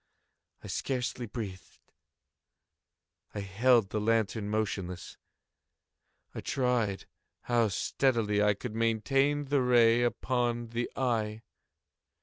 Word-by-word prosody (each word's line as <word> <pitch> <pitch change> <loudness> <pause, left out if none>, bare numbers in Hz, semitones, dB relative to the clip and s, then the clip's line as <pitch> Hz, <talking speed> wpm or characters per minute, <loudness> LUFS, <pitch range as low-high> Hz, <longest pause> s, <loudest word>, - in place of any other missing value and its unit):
I - - -8
scarcely 125 -2 -3
breathed. 100 -5 -7 1.6
I 100 - -2
held 105 +2 +3
the 105 - -1
lantern 110 -1 0
motionless. 95 -4 -3 1.2
I - - -6
tried 120 -7 0 0.4
how 120 -2 +2
steadily 105 0 +1
I 105 -1 +3
could 115 +2 -6
maintain 135 +6 +1
the 140 0 +1
ray 120 -2 +5
upon 120 -1 -1
the 120 +1 -2
eve. 110 -4 -1
115 Hz, 100 wpm, -30 LUFS, 105-125 Hz, 1.6 s, ray